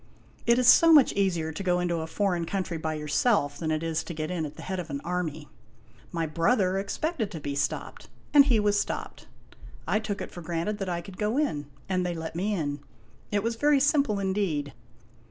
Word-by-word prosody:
It 235 0 +5
is 250 -1 +3
so 330 +6 +8
much 295 -5 +7
easier 175 -5 0
to 160 - -6
go 180 -2 +1
into 175 -1 0
a 160 - -4
foreign 175 -1 0
country 180 -2 -3
by 160 0 -2
yourself 150 0 +1
than 160 - -2
it 155 0 -1
is 165 -1 -1
to 170 - -6
get 155 +2 -3
in 165 -4 -2
at 145 - -12
the - - -10
head 190 -1 -3
of 175 -2 -6
an 140 -1 -3
army. 160 -4 -3 0.6
My 165 -1 -1
brother 185 +4 +1
expected 230 - -2
to 170 -6 -7
be 145 -1 -4
stopped, 140 - -3 0.2
and 285 -2 +8
he 245 -6 +3
was 205 -1 +2
stopped. - - -4 0.6
I 215 - +2
took 210 -2 -4
it - - -6
for 175 - -9
granted 170 +5 -2
that 195 -2 -3
I 170 -1 -2
could 185 0 -12
go 215 +4 0
in, 150 - -1 0.2
and 185 -1 0
they 175 -1 -2
let 160 0 -6
me 195 +5 -1
in. 145 -4 -2 0.5
It 205 -1 +1
was 230 +1 0
very 290 +2 +4
simple 280 -6 +2
indeed. 190 -8 -1
180 Hz, 215 wpm, -27 LUFS, 160-210 Hz, 0.6 s, so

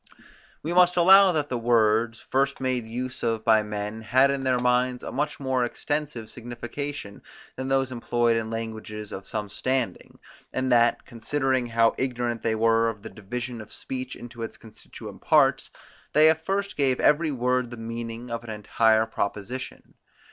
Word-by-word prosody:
We 165 +3 -2
must 180 0 +5
allow 190 +2 +7
that 150 -3 -1
the 125 - -2
words, 115 -1 +2
first 135 +1 0
made 130 -3 -1
use 125 +3 -5
of 115 -1 -1
by 110 -1 +5
men, 105 +1 -5
had 130 +5 +3
in 140 -1 -2
their 130 -1 +2
minds 125 0 +1
a - - -5
much 145 +3 -2
more 130 -2 0
extensive 145 -1 -3
signification, 120 0 -7 0.3
than 130 0 -4
those 135 -1 +1
employed 120 -1 +1
in 110 -1 -2
languages 110 -2 -6
of 95 - -7
some 105 -2 -3
standing, 130 +5 -2 0.3
and 130 0 -1
that, 120 -1 +3
considering 130 +2 -1
how 115 0 +3
ignorant 120 -3 -2
they 110 -1 0
were 115 +1 +3
of 105 -2 -8
the 110 - -8
division 120 +3 -6
of 110 - -13
speech 130 0 -5
into 120 -1 -10
its 115 - -5
constituent 110 -2 -12
parts; - - +3 0.4
they 155 +1 +7
at 160 0 -3
first 200 +1 -2
gave 135 -3 +2
every 155 +2 +3
word 125 -2 0
the 120 - -8
meaning 115 +1 -6
of 115 0 -4
an 120 - -10
entire 110 +1 +2
proposition. 110 +3 -5
120 Hz, 170 wpm, -25 LUFS, 115-130 Hz, 0.4 s, allow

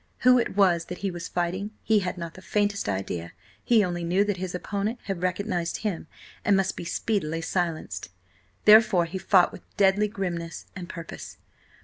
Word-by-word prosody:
Who 250 0 +6
it 230 - -2
was 175 -4 +4
that 180 - -6
he 195 - 0
was 175 0 -6
fighting, 180 +4 -2
he 220 -1 +4
had 180 -1 -3
not 170 -1 -6
the 185 - -12
faintest 205 - 0
idea; 90 -3 -3 0.3
he 230 -3 +4
only 175 -1 -3
knew 180 +4 +2
that 205 -2 -1
his 180 0 -4
opponent 200 +5 -2
had 195 -3 -4
recognised 180 -2 -1
him 180 -6 -2 0.4
and 200 -1 +4
must 190 -1 0
be - - -6
speedily 165 -4 -1
silenced. 165 - -2 0.6
Therefore 210 -5 +7
he 175 +3 -5
fought 185 -1 +4
with - - -10 0.2
deadly 200 +1 +4
grimness 175 -5 -4
and 180 -1 -7
purpose. 170 -2 -8
185 Hz, 175 wpm, -26 LUFS, 170-205 Hz, 0.6 s, Therefore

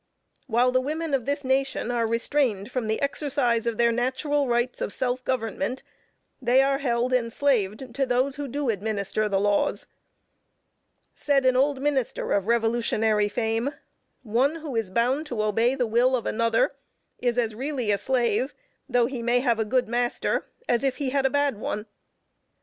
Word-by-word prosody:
While 245 +1 +3
the 255 0 +2
women 310 +3 -3
of 265 -3 0
this 285 +1 -1
nation 265 -2 0
are 235 -2 +1
restrained 230 -2 0
from 250 -4 -2
the 220 0 0
exercise 270 -5 0
of 230 -2 -1
their 235 0 +4
natural 260 +4 0
rights 240 +1 0
of - - -2
self 255 +1 -2
government, 245 -1 -2 0.6
they 255 +2 +4
are 275 0 +1
held 245 -2 0
enslaved 235 -2 0
to 270 +1 0
those 255 +2 +1
who 285 0 -4
do 280 0 -2
administer 210 0 -2
the 195 -1 +1
laws. 205 0 +1 1.3
Said 275 -2 +1
an 255 -1 +4
old 270 +1 +2
minister 275 -4 -1
of 200 0 0
revolutionary 225 -2 +2
fame, 225 +5 -1 0.5
"One 255 +7 +1
who 310 -6 -6
is 225 -4 -1
bound 250 +9 0
to 235 -6 -2
obey 225 +4 +2
the 255 -2 0
will 240 +3 +3
of 240 - -3
another 230 0 +1 0.5
is 245 -1 0
as 230 -3 +1
really 255 -2 -2
a 200 - +1
slave, 245 +1 0 0.3
though 245 -1 +3
he 250 -1 -4
may 240 +1 +2
have 235 -4 +1
a 220 - +1
good 255 +2 +1
master, 240 +1 -1 0.2
as 240 - +1
if 270 -2 +1
he 275 -3 -2
had 275 -1 +2
a - - -2
bad 285 -5 0
one." 210 0 -3
245 Hz, 170 wpm, -25 LUFS, 225-270 Hz, 1.3 s, their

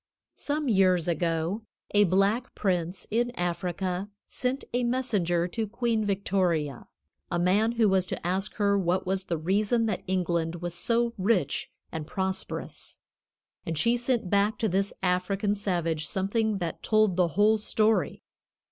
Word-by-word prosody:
Some 295 0 -2
years 185 -6 +3
ago 170 +4 0 0.3
a 205 0 +6
black 200 +7 +1
prince 180 -2 -1
in 240 +2 +1
Africa 180 +2 -2 0.2
sent 255 +2 -2
a 245 0 +1
messenger 205 -9 +1
to 220 +5 -2
Queen 230 0 0
Victoria, 180 -8 0 0.4
a 175 - -1
man 200 +6 +2
who 230 -2 +3
was 190 -2 +2
to - - -5
ask 190 +3 -1
her 200 -1 +2
what 185 +1 0
was 190 0 -1
the 170 - -1
reason 205 +8 +1
that 210 -5 -1
England 170 -3 0
was 175 0 -5
so 230 +6 +1
rich 185 -8 +1 0.2
and 155 -2 -5
prosperous; 190 +2 -4 0.7
and 165 -1 -3
she 235 +10 +3
sent 245 -3 0
back 200 +3 +2
to 225 - 0
this 195 +1 0
African 190 +3 +1
savage 170 -6 -1
something 210 +2 0
that 170 -3 -4
told 215 -4 +3
the 180 -1 +3
whole 215 +1 +5
story. 215 +1 +1
195 Hz, 145 wpm, -27 LUFS, 175-220 Hz, 0.7 s, a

